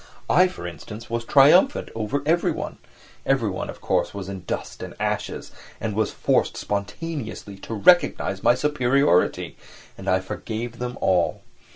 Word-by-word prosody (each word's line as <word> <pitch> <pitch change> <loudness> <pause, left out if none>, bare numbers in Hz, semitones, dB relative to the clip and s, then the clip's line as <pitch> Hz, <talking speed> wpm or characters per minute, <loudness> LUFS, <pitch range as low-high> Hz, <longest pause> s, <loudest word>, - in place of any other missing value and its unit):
I, 185 +1 +6
for 180 - -8
instance, 105 +8 -8
was 115 0 -1
triumphant 150 - +5
over 115 +6 -2
everyone; 170 +3 0 0.4
everyone, 115 -9 0
of - - -9
course, - - 0
was 100 -1 -5
in 95 -2 -7
dust - - -5
and - - -7
ashes, - - -3 0.3
and 110 -2 -3
was 110 +1 +1
forced - - +1
spontaneously 110 0 -4
to 110 +3 -6
recognise 105 - +3
my 120 - +4
superiority, 130 -7 +2 0.4
and - - -4
I 95 - +3
forgave 110 +5 -5
them 125 0 -4
all. 90 -2 +1
115 Hz, 145 wpm, -24 LUFS, 100-140 Hz, 0.4 s, I